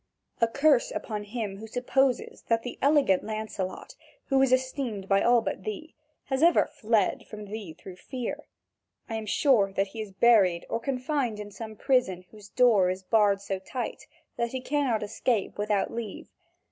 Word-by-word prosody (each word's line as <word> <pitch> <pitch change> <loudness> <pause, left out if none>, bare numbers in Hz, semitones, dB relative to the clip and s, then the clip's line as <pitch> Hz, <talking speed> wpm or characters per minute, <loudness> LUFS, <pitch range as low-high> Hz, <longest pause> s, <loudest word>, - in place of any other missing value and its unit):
A 230 - +5
curse 280 +2 +3
upon 210 -2 -4
him 210 -2 -4
who 220 +2 -9
supposes 250 +2 0
that 230 0 +1
the 245 - -7
elegant 280 -9 +4
Lancelot, 215 -3 -5 0.4
who 270 -1 +4
is 270 -1 +3
esteemed 255 -6 -1
by 195 0 +3
all 240 0 +4
but 195 - -4
thee, 215 - -6 0.3
has 265 0 -2
ever 340 +1 +5
fled 215 -3 0
from 210 -1 -8
thee 205 -5 -7
through 185 +3 -12
fear. 250 +3 -6 0.6
I 225 - -6
am 220 -1 -4
sure 210 -5 +3
that 195 0 0
he 220 +3 -6
is 210 -2 -7
buried 190 -5 +4
or 230 - 0
confined 255 -2 -2
in 205 0 -7
some 220 +1 -8
prison 205 -8 +1
whose 210 -2 -14
door 220 -8 +4
is 185 +1 -3
barred 205 -1 +3
so 195 -1 -3
tight 245 +6 -5 0.3
that 235 0 0
he 260 - -3
cannot 260 -5 0
escape 210 0 -1
without 205 -1 0
leave. 230 -4 -6
220 Hz, 170 wpm, -27 LUFS, 200-255 Hz, 0.6 s, A